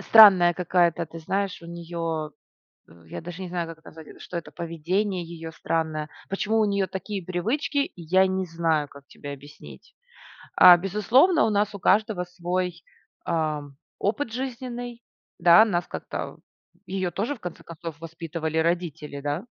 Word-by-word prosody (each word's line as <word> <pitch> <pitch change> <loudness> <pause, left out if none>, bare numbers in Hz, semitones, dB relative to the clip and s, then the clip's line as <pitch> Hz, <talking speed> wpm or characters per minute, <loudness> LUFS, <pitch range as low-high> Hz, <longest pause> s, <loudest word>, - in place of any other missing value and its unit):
Странная 190 -6 +8
какая-то, 175 -1 +2
ты 165 +1 -10
знаешь, 195 +4 -2
у - - -10
неё 165 -2 -4 0.6
в 85 0 -19
я - - -7
даже 175 +2 -8
не 180 - -5
знаю, 175 -1 -2
как 160 - -28
назвать 160 -1 -12
это, - - -14
что 175 - -7
это 170 - -5
поведение 175 +3 -2
её 165 -1 -8
странное. 160 -1 -2 0.2
Почему 215 +3 0
у - - +4
неё 200 -1 +1
такие 190 0 -5
привычки, 270 - -1
я 185 +3 +3
не 190 0 -1
знаю, 165 -3 0
как 140 0 -15
тебе 145 -1 -8
объяснить. 145 +2 -13 0.6
А, 180 -1 +10
безусловно, 225 - +3
у - - +1
нас 210 0 +1
у - - -5
каждого 205 -1 +2
свой, 180 -1 -3 0.4
ам 150 -4 -2 0.2
опыт 225 +4 -1
жизненный. 245 -1 -5 0.4
Да, 170 +4 +8
нас 175 -6 -1
как-то - - -6 0.5
в - - -15
её 190 -2 -1
тоже, 225 - -2
в - - -22
конце 180 -2 -7
концов, 165 -2 -8
воспитывали 165 -1 -4
родители, 160 -4 -1
да. 145 +7 -2
175 Hz, 160 wpm, -25 LUFS, 160-200 Hz, 0.6 s, А